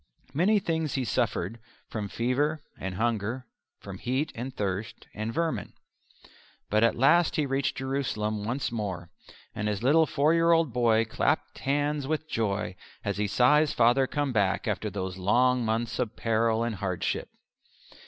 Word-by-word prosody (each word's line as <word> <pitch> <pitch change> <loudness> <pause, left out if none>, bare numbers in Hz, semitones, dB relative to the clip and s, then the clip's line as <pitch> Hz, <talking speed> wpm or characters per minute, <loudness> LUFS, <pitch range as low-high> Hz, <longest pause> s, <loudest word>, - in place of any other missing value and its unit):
Many 185 +9 +3
things 160 -6 -1
he 130 -2 0
suffered 95 +2 -1 0.3
from 105 -2 -4
fever 145 +7 0
and 95 -1 -5
hunger, 115 +3 -1 0.3
from 95 -2 -9
heat 130 +5 -1
and 125 +3 -5
thirst, 100 -2 -4
and 110 +1 -3
vermin. 165 +6 -2 1.0
But 110 +2 +3
at 115 - +4
last 170 +7 +4
he 150 - +1
reached 135 0 -1
Jerusalem 120 -6 -2
once 120 +5 -2
more; 95 -6 -4 0.4
and 105 - -3
his 105 +1 -2
little 155 +5 +5
four 150 +3 +2
year 170 0 +4
old 165 -7 +2
boy 115 -2 +3
clapped 110 - -1
hands 145 0 0
with 155 +1 -2
joy 105 -7 -1 0.3
as - - -1
he 105 0 0
saw 125 +8 +5
his 150 -2 +1
father 125 +3 +4
come 145 -2 -1
back 100 -4 +1
after - - -1
those 95 -2 -4
long 125 +6 +3
months 115 0 -1
of 120 -4 -1
peril 115 0 +1
and 115 -3 -2
hardship. 95 -2 -2
120 Hz, 160 wpm, -28 LUFS, 105-140 Hz, 1.0 s, little